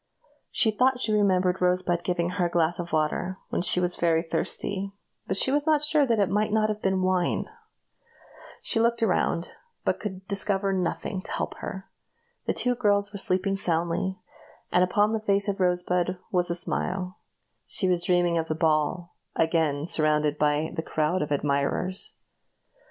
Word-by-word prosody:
She 225 - +2
thought 250 +4 +2
she 220 -4 0
remembered 185 -3 +2
Rosebud 180 -1 +1
giving 175 -1 -1
her 180 -2 0
a - - -6
glass 170 0 +1
of 175 0 -5
water 160 +4 -1
when - - -1
she 180 - +2
was 180 0 0
very 165 -1 +2
thirsty, 195 +3 -2 0.3
but 190 - -1
she 265 - +2
was 290 +2 0
not 305 -2 +3
sure 300 -2 +4
that 230 -2 +2
it 200 - +3
might 210 +3 0
not 215 0 +2
have 215 0 -3
been 190 -1 +1
wine. 185 -1 +1 1.2
She - - +3
looked 230 0 +2
around, 180 -4 0 0.3
but - - 0
could 190 -2 -6
discover 200 -1 +1
nothing 185 +1 -2
to - - -8
help - - -3
her. 190 0 -7 0.6
The - - +2
two 250 - +1
girls 205 -3 +1
were 200 - -5
sleeping 190 +1 +1
soundly, 175 +1 0 0.5
and 180 - +4
upon 205 +4 +2
the 220 - 0
face 200 -1 +1
of 200 0 -2
Rosebud 180 -1 +1
there 185 0 -4
was 180 -1 +2
a 170 - +2
smile. 185 +1 -1 0.5
She 190 - +2
was 175 -1 +1
dreaming 175 -1 +2
of 160 - -3
the 155 - -2
ball 160 +2 0 0.2
again 160 -3 +1
surrounded 150 -2 +1
by 150 +1 +1
a - - -1
crowd 155 +3 -1
of 150 - -3
admirers. 145 +6 -1
185 Hz, 175 wpm, -26 LUFS, 170-200 Hz, 1.2 s, sure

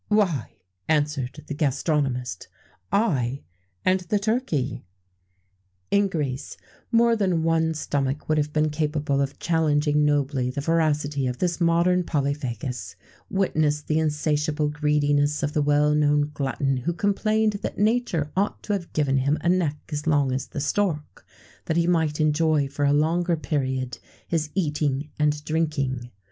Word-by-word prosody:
"Why," 190 - +1 0.3
answered 150 -2 0
the - - -5
gastronomist, 135 - -1 0.4
"I 140 - +1 0.4
and 185 +1 +4
the 185 +3 -1
turkey." 185 - -1 1.1
In 200 0 +4
Greece, 145 -7 -3 0.3
more 235 0 +4
than 185 -6 +1
one 160 0 +1
stomach 140 -1 -2
would 155 0 +2
have 150 0 -1
been 155 0 +1
capable 150 -2 0
of 140 0 -2
challenging 150 -3 +2
nobly 140 -3 +1
the 130 - -4
voracity 150 -3 +1
of 125 0 -3
this 175 +3 -1
modern 170 +2 +3
polyphagus: 135 - -3 0.3
witness 155 -6 +1
the 155 +1 0
insatiable 150 -1 0
greediness 145 0 +1
of 145 +1 -1
the 150 - +2
well 145 +1 +3
known 150 0 +2
glutton 135 -1 -1
who 150 +8 -2
complained 210 +3 +1
that - - -4
nature 210 -9 +1
ought 200 +2 -1
to 210 - -1
have 185 -4 -3
given 140 -3 +1
him 140 +3 +1
a 170 - +1
neck 170 -5 +1
as 150 +1 -3
long 145 -4 +3
as 130 +1 -2
the - - -6
stork, 155 -1 -1 0.4
that 160 - 0
he 170 - +3
might 160 -3 +1
enjoy 155 -1 +2
for 145 +1 -2
a 140 - +4
longer 165 +4 +2
period 130 -4 -2 0.3
his 155 -3 -1
eating 150 -4 -1
and 150 0 +1
drinking. 140 -6 -1
150 Hz, 145 wpm, -25 LUFS, 140-165 Hz, 1.1 s, and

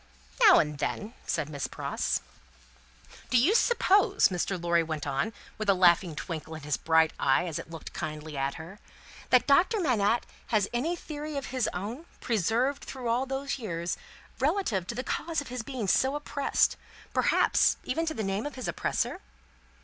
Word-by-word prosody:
"Now - - +9
and 150 -1 +1
then," 210 +9 -3
said 155 -3 -1
Miss 145 -2 -4
Pross. - - -2 1.1
"Do 250 - +4
you 290 - +4
suppose," 415 -4 +4
Mr. 185 +1 -2
Lorry 170 0 +2
went 155 -2 -4
on, 140 +10 -1 0.3
with 215 -2 -1
a 195 - +6
laughing 175 -2 +4
twinkle 160 0 -5
in 155 - -9
his 150 -1 0
bright 160 -1 +3
eye, 140 +6 +3
as 165 -2 -3
it 165 - -9
looked 165 -1 -9
kindly 155 0 -5
at 135 0 -1
her, 170 +6 -10 0.5
"that 250 - +5
Doctor 350 +10 +4
Manette 235 - +2 0.2
has 210 -3 +2
any 300 +9 0
theory 300 -2 -6
of 275 - -3
his 255 -3 +1
own, 225 - -6
preserved 235 +6 0
through 255 -3 -5
all 245 +3 +1
those 270 +1 -3
years, 170 -6 -3 0.4
relative 265 - 0
to 235 - -4
the 255 - -3
cause 325 +3 -2
of 285 - -6
his 250 -1 -4
being 235 -3 -4
so 265 +8 +3
oppressed; 295 -1 +1 0.4
perhaps, - - +3
even 330 0 -1
to 315 - -1
the 220 - -2
name 195 +6 -1
of 295 - -8
his 255 - -5
oppressor?" - - -1
220 Hz, 175 wpm, -28 LUFS, 165-275 Hz, 1.1 s, Now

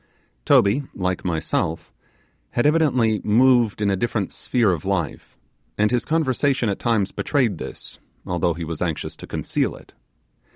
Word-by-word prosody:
Toby, 100 +8 +4
like 90 -1 -2
myself, 85 -3 -2 0.6
had 120 - +1
evidently 130 -9 +3
moved 120 -1 +3
in 100 - +2
a - - +2
different 105 0 -2
sphere 115 -6 +1
of 85 -4 -3
life, 95 -9 -3 0.4
and 105 +1 +2
his 125 -1 0
conversation 140 -5 +1
at 100 - -2
times 110 -5 +1
betrayed 120 - 0
this, - - -8 0.3
although 85 -1 0
he 85 -1 -5
was 80 -1 -5
anxious 85 -4 -3
to - - -10
conceal - - -2
it. - - -16
105 Hz, 150 wpm, -22 LUFS, 90-125 Hz, 0.6 s, Toby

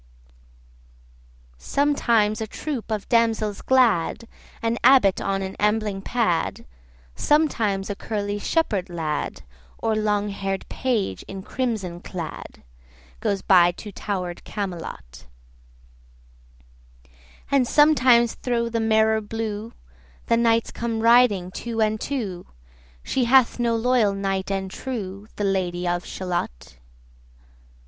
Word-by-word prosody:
Sometimes 230 - +1
a 220 - -2
troop 265 +1 -5
of 215 -2 -3
damsels 225 -3 +1
glad, 245 -11 +2 0.4
55 - - -26
An 230 +1 0
abbot 250 -8 +5
on 195 0 -1
an 190 0 -5
ambling 210 -1 0
pad, 220 -7 -1 0.5
Sometimes 225 -11 +1
a 205 - -2
curly 205 -1 -3
shepherd 205 - 0
lad, 160 -4 -3 0.3
Or 220 - 0
long 210 -1 0
hair'd 195 -1 -4
page 220 - -1
in 195 -1 -7
crimson 215 -10 -3
clad, 175 -3 -8 0.6
Goes 200 -1 -1
by 175 -2 +5
to 210 +3 -9
tower'd 180 -3 -4
Camelot; 165 - -6 2.2
And 270 -3 +3
sometimes 255 -6 +5
thro' 235 -2 -1
the 230 0 -1
mirror 220 0 +3
blue 220 0 -4 0.5
60 - - -28
The 230 - +2
knights 230 -1 +2
come 230 -1 -3
riding 230 -6 +4
two 230 +3 -5
and 215 0 +1
two: 205 -11 -4 0.6
She 255 - 0
hath 250 0 +4
no 235 -1 +1
loyal 225 -3 +2
knight 195 -1 -2
and 190 -1 -2
true, 205 -4 -6
The 205 - -3
Lady 180 -2 -1
of 175 0 -1
Shalott. 175 - -5
215 Hz, 120 wpm, -23 LUFS, 190-235 Hz, 2.2 s, abbot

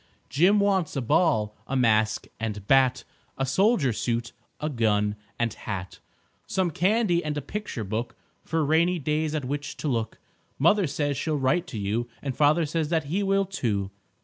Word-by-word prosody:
Jim 185 +8 +4
wants 195 -6 +1
a - - 0
ball, 110 -5 +2
a 135 - -2
mask 110 -3 +2
and 105 -3 -4
bat, 130 +1 +3 0.3
A 135 - 0
soldier 165 - +2
suit, 120 +1 -2 0.3
a 150 - -2
gun 105 -6 +1 0.2
and 115 -2 0
hat, 95 -3 -6 0.5
Some 185 -3 0
candy 185 +1 +2
and 150 -1 -3
a - - +1
picture 205 - -5
book 110 +4 -3 0.3
For 160 -1 0
rainy 170 +4 +3
days 155 +1 -1
at 150 -4 -2
which 145 +2 -4
to - - -4
look. 115 -4 -1 0.4
Mother 180 +5 +4
says 145 -1 -1
she'll 155 +2 -1
write 165 +7 +1
to 125 - -6
you, 105 +4 -2
And 135 -3 -3
father 155 +3 +3
says 155 0 -1
that 165 -2 +1
he 200 - +1
will, 195 0 +2
too. 105 - -2
145 Hz, 175 wpm, -26 LUFS, 115-170 Hz, 0.5 s, Jim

